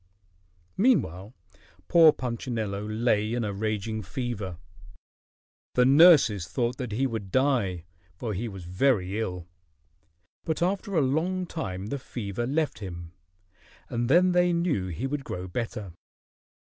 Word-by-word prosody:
Meanwhile 115 - +1 0.5
poor 165 -2 +7
Punchinello 115 -6 -3
lay 110 0 +1
in 120 - -1
a 105 -2 -2
raging 110 +1 -2
fever. 105 -4 -4 1.2
The 125 - +5
nurses 135 - +6
thought 120 +7 -1
that 125 -4 -4
he 130 +5 +1
would 110 -6 -4
die, 120 - +1 0.3
for 110 +4 -4
he 110 +5 -3
was 95 -4 -8
very 95 +1 +1
ill. 90 -5 -4 1.0
But 160 +1 -1
after 195 +2 -1
a 160 - +4
long 165 +7 0
time 95 - -5
the 140 - -3
fever 120 -2 -4
left 150 0 -1
him, 85 -4 -8 0.8
and 120 0 -1
then 180 +5 +5
they 180 0 +3
knew 170 - 0
he 90 +8 -4
would 140 +1 -3
grow 90 -6 -5
better. 105 -2 -5
115 Hz, 130 wpm, -27 LUFS, 100-140 Hz, 1.2 s, poor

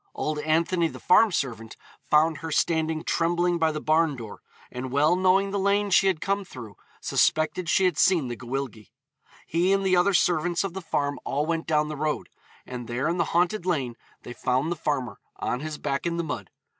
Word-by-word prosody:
Old 155 0 -2
Anthony 165 +3 +1
the - - -9
farm 215 +4 +5
servant, 115 -8 -3 0.3
found 155 +1 +4
her 160 - -6
standing 160 0 0
trembling 175 +1 +1
by 160 -1 +2
the 150 - -4
barn 155 0 +2
door, 115 -4 -9 0.3
and 125 +1 -6
well 150 +5 +3
knowing 190 +2 +2
the 200 - -1
lane 200 +1 +1
she 195 - +5
had 185 -5 +1
come 200 +3 -1
through 120 - -11 0.2
suspected 165 +2 +1
she 190 - +3
had 180 -5 +1
seen 175 -8 +3
the 120 - -4
Gwyllgi. 125 -2 -5 0.6
He 175 +4 +1
and 195 0 +2
the 185 -1 +3
other 180 +2 +3
servants 175 0 +2
of 195 -3 -4
the 190 - -5
farm 145 -4 -2
all 145 +2 -1
went 165 0 -2
down 150 -1 +2
the 155 - -5
road, 150 +1 -2 0.4
and 125 -2 -7
there 120 +5 -2
in 170 +2 0
the 170 - +1
haunted 175 +5 +1
lane 135 -9 -1 0.3
they 120 - -8
found 130 +6 -1
the - - 0
farmer, 130 - -3 0.2
on 125 - -2
his 155 +1 -5
back 140 +3 -2
in 170 0 -2
the 170 - -1
mud. 155 - -5
160 Hz, 205 wpm, -26 LUFS, 140-180 Hz, 0.6 s, farm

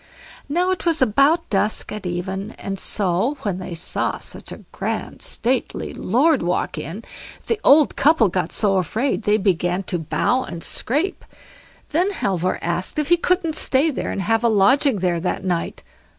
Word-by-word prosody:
Now 355 +5 +1
it 370 - -2
was 330 -1 +2
about 275 +8 +3
dusk 210 +1 0
at 210 -3 -5
even, 190 +4 -4
and 195 -1 -6
so, 200 +11 0
when 190 -3 -2
they 180 -2 -6
saw 165 - -1
such - - -8
a - - -10
grand - - -4
stately 260 - -1
lord 290 +3 +2
walk 175 +1 -1
in, 185 +10 -6 0.4
the 455 - -1
old 295 +1 +5
couple 285 -6 +4
got 180 -2 -2
so 200 -3 +1
afraid 220 - 0
they 210 +1 +4
began 180 -2 0
to 175 -1 -2
bow 160 - 0
and 170 -1 -7
scrape. 305 - -1 0.7
Then 350 +6 +1
Halvor 185 - -1
asked 175 - -2
if 300 0 0
he 350 - +7
couldn't 350 -2 +1
stay 300 +1 +1
there, - - -3
and 195 - -3
have 225 +4 +1
a 235 - +4
lodging 230 +6 +4
there 175 -2 +1
that 180 +2 -3
night. 175 -2 -2
215 Hz, 170 wpm, -21 LUFS, 185-290 Hz, 0.7 s, he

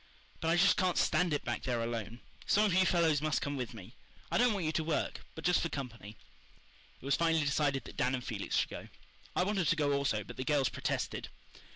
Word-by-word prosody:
But 160 - -2
I 165 +1 +3
just 195 +3 +5
can't 185 -3 +1
stand 180 -2 +2
it 145 - -1
back - - -2
there 125 -2 -1
alone. 115 0 -4 0.3
Some 210 +1 +4
of 200 - +1
you 185 0 +4
fellows 160 -5 +3
must 155 0 +1
come 145 0 -2
with 125 -3 -4
me. 105 +2 -11 0.4
I - - +2
don't 245 0 +5
want 195 -5 -2
you 155 - +1
to 160 - -1
work, 155 0 -1 0.2
but 160 - -8
just 180 0 +3
for 165 - -1
company." 115 -8 -7 0.8
It - - -14
was 140 - +3
finally 165 -2 +2
decided 140 -1 +1
that - - -11
Dan 125 +1 +1
and 125 - -5
Felix - - -3
should - - +1
go. - - -8 0.5
I - - +3
wanted 190 -3 0
to - - +3
go 145 -3 +1
also, 135 -7 0
but 100 - -10
the 130 - -2
girls 140 -1 +2
protested. - - -3
150 Hz, 235 wpm, -32 LUFS, 130-170 Hz, 0.8 s, just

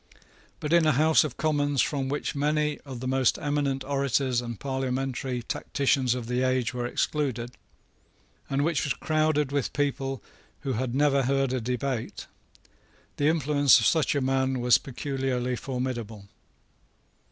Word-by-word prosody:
But 150 +2 -2
in 170 -2 +5
a 155 - +4
House 155 +4 +4
of 150 -5 -5
Commons 145 -3 0
from 135 -1 0
which 145 +2 -2
many 150 +1 0
of 130 -4 -7
the 130 - -3
most 130 -1 +2
eminent 145 -2 -1
orators 135 -2 0
and 120 -3 -6
parliamentary 130 -2 -2
tacticians 130 -1 0
of 125 -2 -5
the 125 +2 -1
age 130 -2 +1
were 120 -1 -2
excluded, 125 -3 -1 1.0
and 140 +1 +1
which 160 -4 +1
was 140 - -1
crowded 155 -2 +1
with 140 -2 -1
people 135 -2 -2 0.4
who 135 -2 -2
had 125 +1 -2
never 140 -1 +3
heard 135 0 +1
a 130 - -1
debate, 125 0 -3 0.9
the 145 - +2
influence 145 -4 +4
of 110 - 0
such 160 -3 +2
a 140 - +1
man 130 0 +1
was 120 -1 +5
peculiarly 130 -2 -2
formidable. 120 -6 -4
135 Hz, 150 wpm, -27 LUFS, 125-145 Hz, 1.0 s, in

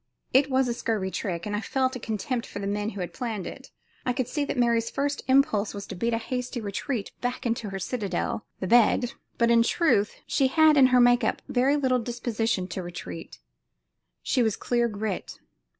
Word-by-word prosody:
It 270 +2 +5
was 260 -1 +2
a 240 - 0
scurvy 215 -5 -2
trick, 175 -5 -3
and 210 0 -2
I 210 - -1
felt 260 +5 0
a - - -4
contempt 230 +2 -3
for - - -8
the 200 - -4
men 205 +1 -1
who 200 -3 -6
had 175 - -5
planned 225 -6 -4
it. - - -9 0.3
I 250 - 0
could 250 -1 -1
see 290 +3 -1
that 280 - -3
Mary's 235 -1 +2
first 285 +1 -1
impulse 260 -7 +3
was 200 0 -6
to - - -7
beat 230 +5 0
a - - 0
hasty 250 +2 -3
retreat 210 +2 -3
back 250 +1 -3
into 230 -2 -1
her 195 - -4
citadel, 205 +1 -2 0.2
the - - -3
bed, 240 +3 +4 0.3
but 235 -1 +3
in 230 0 +6
truth 230 - +2
she 270 - +2
had 310 +3 +5
in 270 -2 +7
her 250 -1 +4
make 245 0 +5
up 220 - -1
very 260 +3 +2
little 260 -3 +2
disposition 230 -4 -1
to 185 - -4
retreat. 170 - -8 0.9
She 255 - +1
was 220 -4 +1
clear 240 -1 +1
grit. 210 -3 -4
235 Hz, 205 wpm, -26 LUFS, 205-255 Hz, 0.9 s, in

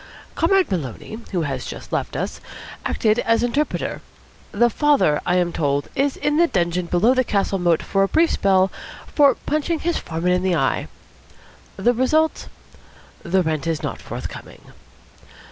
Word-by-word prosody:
Comrade 370 - +2
Maloney, 170 - -4
who 175 -4 0
has 135 -4 -3
just - - -9
left - - -2
us, - - -4 0.4
acted 220 +1 +1
as 230 +1 +2
interpreter. 280 +5 -1 0.5
The 240 +3 +3
father, 285 - +2
I 180 - +2
am 175 -1 +1
told, 145 -2 -1
is 275 0 0
in 295 0 0
the 340 +1 +5
dungeon 175 - -1
below 190 +9 +3
the 255 0 +2
castle 200 -3 0
moat 175 -2 +2
for 195 - 0
a 195 - +4
brief 325 +9 +3
spell 190 -1 +2 0.3
for 285 -2 +4
punching 310 +2 -1
his 345 0 0
foreman 165 +2 -2
in 180 0 +2
the 185 -1 +1
eye. 135 -4 0 0.9
The 240 +6 +2
result? 310 +6 +1 0.7
The 185 +2 +1
rent 160 -1 -2
is 165 -2 -2
not - - -4
forthcoming." - - -9
195 Hz, 160 wpm, -21 LUFS, 170-280 Hz, 0.9 s, the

